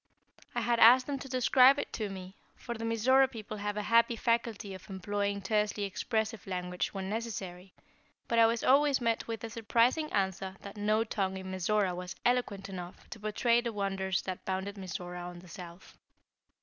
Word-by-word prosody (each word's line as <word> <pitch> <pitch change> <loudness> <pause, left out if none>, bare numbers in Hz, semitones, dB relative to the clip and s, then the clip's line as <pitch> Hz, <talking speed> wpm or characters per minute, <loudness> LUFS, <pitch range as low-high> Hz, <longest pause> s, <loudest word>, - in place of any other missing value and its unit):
I - - +1
had 235 -1 +1
asked 250 +3 +8
them 280 -1 -3
to 270 - -8
describe 255 +1 +5
it - - -4
to 215 -2 -3
me, 190 0 -8 0.2
for 240 - -6
the 225 -1 -7
Mizora 250 +4 +4
people 215 -3 -7
have 205 0 -3
a 210 - -1
happy 230 +2 +4
faculty 230 -3 -1
of 190 +2 -11
employing 200 +1 -2
tersely 210 0 0
expressive 220 +2 -2
language 180 -1 -2
when 190 -1 -5
necessary; 195 -4 -5 0.5
but 230 - +2
I 225 - +7
was 230 0 -1
always 280 +1 +4
met 230 -2 0
with 225 -2 -4
the 230 - -5
surprising 235 +7 +1
answer 190 -1 -1
that 200 0 -9
no 215 +1 +2
tongue 195 -4 -2
in 190 0 -7
Mizora 190 +1 +1
was 180 0 -6
eloquent 240 -5 +1
enough 180 -2 -8
to 220 - -7
portray 230 +3 +2
the 235 -1 -3
wonders 195 -2 -1
that 185 -1 -5
bounded 190 +2 -3
Mizora 180 -2 -6
on 175 0 -7
the 180 +1 -13
south. 175 -1 -11
210 Hz, 185 wpm, -31 LUFS, 190-230 Hz, 0.5 s, asked